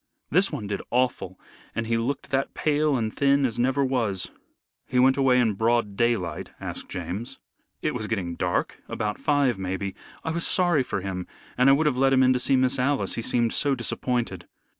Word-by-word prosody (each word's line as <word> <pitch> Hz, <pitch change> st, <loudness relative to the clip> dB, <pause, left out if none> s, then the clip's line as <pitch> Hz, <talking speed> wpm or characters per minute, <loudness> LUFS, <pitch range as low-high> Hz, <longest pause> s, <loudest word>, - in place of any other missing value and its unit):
"This 185 Hz, +5 st, +3 dB
one 105 Hz, -, -4 dB
did 100 Hz, -1 st, -3 dB
awful, 120 Hz, -7 st, -1 dB, 0.4 s
and 115 Hz, -, -1 dB
he 115 Hz, +1 st, 0 dB
looked 130 Hz, +5 st, -2 dB
that 135 Hz, 0 st, -1 dB
pale 150 Hz, -2 st, +1 dB
and 110 Hz, -2 st, -2 dB
thin 140 Hz, 0 st, +3 dB
as 120 Hz, -2 st, -2 dB
never 135 Hz, +3 st, +2 dB
was." 115 Hz, -8 st, -1 dB, 0.6 s
"He 125 Hz, -, -2 dB
went 130 Hz, +1 st, +5 dB
away 130 Hz, -2 st, +4 dB
in 115 Hz, -4 st, +2 dB
broad 110 Hz, 0 st, +1 dB
daylight?" 115 Hz, -6 st, 0 dB
asked -, -, -6 dB
James. 105 Hz, +7 st, -5 dB, 0.5 s
"It -, -, 0 dB
was 110 Hz, -, -3 dB
getting 95 Hz, -6 st, -2 dB
dark 90 Hz, +1 st, -2 dB
about 105 Hz, -1 st, -3 dB
five 140 Hz, -7 st, +2 dB
maybe. 95 Hz, +1 st, -3 dB, 0.3 s
I 160 Hz, -, -2 dB
was 170 Hz, +1 st, -1 dB
sorry 175 Hz, -6 st, +3 dB
for 105 Hz, -6 st, -3 dB
him, 90 Hz, -1 st, -4 dB, 0.3 s
and 125 Hz, +2 st, +4 dB
I -, -, +8 dB
would 155 Hz, +3 st, +2 dB
have 135 Hz, -4 st, +1 dB
let 135 Hz, 0 st, +4 dB
him 130 Hz, 0 st, +5 dB
in 130 Hz, 0 st, +5 dB
to 125 Hz, -, 0 dB
see 135 Hz, +2 st, +3 dB
Miss 130 Hz, +1 st, +2 dB
Alice, 140 Hz, +2 st, +1 dB
he -, -, -2 dB
seemed 115 Hz, 0 st, +1 dB
so 140 Hz, -2 st, +2 dB
disappointed." 120 Hz, -6 st, -2 dB
125 Hz, 200 wpm, -25 LUFS, 105-135 Hz, 0.6 s, I